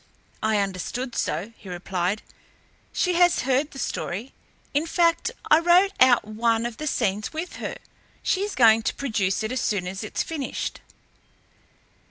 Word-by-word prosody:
"I 220 -1 +2
understood 200 +6 -2
so," 205 +7 -2
he 195 - -11
replied. 180 +2 -2 0.7
"She 360 - +1
has 350 0 +4
heard 270 +3 +1
the 275 - -12
story 230 -1 -4 0.4
in 295 +3 +1
fact 335 0 +2 0.2
I 310 - +8
wrote 355 +4 +5
out 255 -3 +6
one 225 +2 0
of 240 -2 -4
the 305 - -4
scenes 210 -4 -1
with 330 +3 -5
her. - - -5 0.5
She 375 - +1
is 410 0 -2
going 225 -2 +6
to - - -7
produce 215 -7 0
it 215 - -2
as 255 -1 -1
soon 200 -4 0
as 190 +3 -5
it's 215 - -2
finished." 300 -5 -4
235 Hz, 160 wpm, -25 LUFS, 210-310 Hz, 0.7 s, I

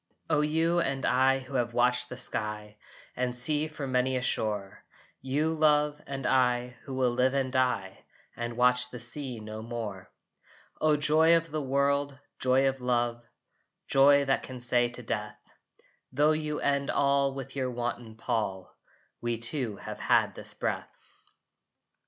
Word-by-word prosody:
O 150 -1 +3
you 165 +3 +2
and 135 -5 -1
I 130 +1 +3
who 135 +1 -10
have 120 -2 -1
watched 125 0 +2
the 125 - -7
sky 105 -3 -4 0.4
And 125 0 -2
sea 150 +4 +1
from 145 -4 -6
many 130 +1 +1
a 130 - 0
shore! 105 -5 -2 0.4
You, 145 +5 0
love, 150 -1 +2
and 135 -1 -5
I 125 -1 +2 0.2
who 135 - -6
will 130 -2 +2
live 130 +2 +1
and 135 -2 0
die 125 -7 0 0.3
And 120 0 -5
watch 125 0 +3
the 125 - -8
sea 125 +1 -2
no 110 0 -7
more! 110 -5 -6 0.7
O 155 -1 +3
joy 160 +3 +5
of 165 -1 -4
the 155 0 -2
world! 140 +1 0 0.2
Joy 130 +1 +3
of 135 -1 -2
love, 120 -1 0 0.6
Joy 140 +1 +5
that 135 - +1
can 130 -1 -8
say 120 0 +2
to 120 +1 -10
death, 105 -1 -4 0.7
"Tho 145 +4 +3
you 155 -1 -2
end 140 -1 0
all 140 -1 +2
with 135 -1 -7
your 130 -2 -1
wanton 120 -2 -4
pall, 105 -5 -3 0.5
We 120 -1 -1
two 115 -1 -1
have - - -8
had - - +2
this - - -3
breath!" - - -3
130 Hz, 160 wpm, -29 LUFS, 120-140 Hz, 0.7 s, joy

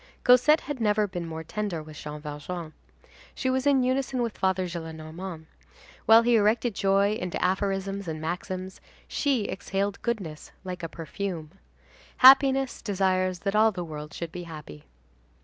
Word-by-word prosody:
Cosette 255 +5 +6
had 290 -3 -5
never 210 -1 +3
been 175 -4 -5
more 160 0 -6
tender 180 -2 -3
with 155 0 -12
Jean 150 0 -7
Valjean. 155 +2 -6 0.6
She 260 - 0
was 260 +2 0
in 270 -2 +4
unison 260 0 0
with 230 -2 -3
Father 190 -1 +1
Gillenormand; 160 0 -7 0.6
while 225 +1 +8
he 240 0 +4
erected 220 +2 +2
joy 195 +1 +2
into 180 -5 -3
aphorisms 195 +1 -1
and 160 -1 -4
maxims, 185 +3 -5 0.3
she 265 -7 0
exhaled 195 +1 -3
goodness 190 -11 -4
like 180 -1 -6
a 165 - -4
perfume. 165 0 -5 0.7
Happiness 270 0 +6
desires 185 -2 0
that 200 0 -1
all 220 +1 +5
the 180 -3 -5
world 150 -1 -7
should 170 -2 -6
be 180 - -6
happy. 150 - -10
190 Hz, 150 wpm, -27 LUFS, 165-220 Hz, 0.7 s, while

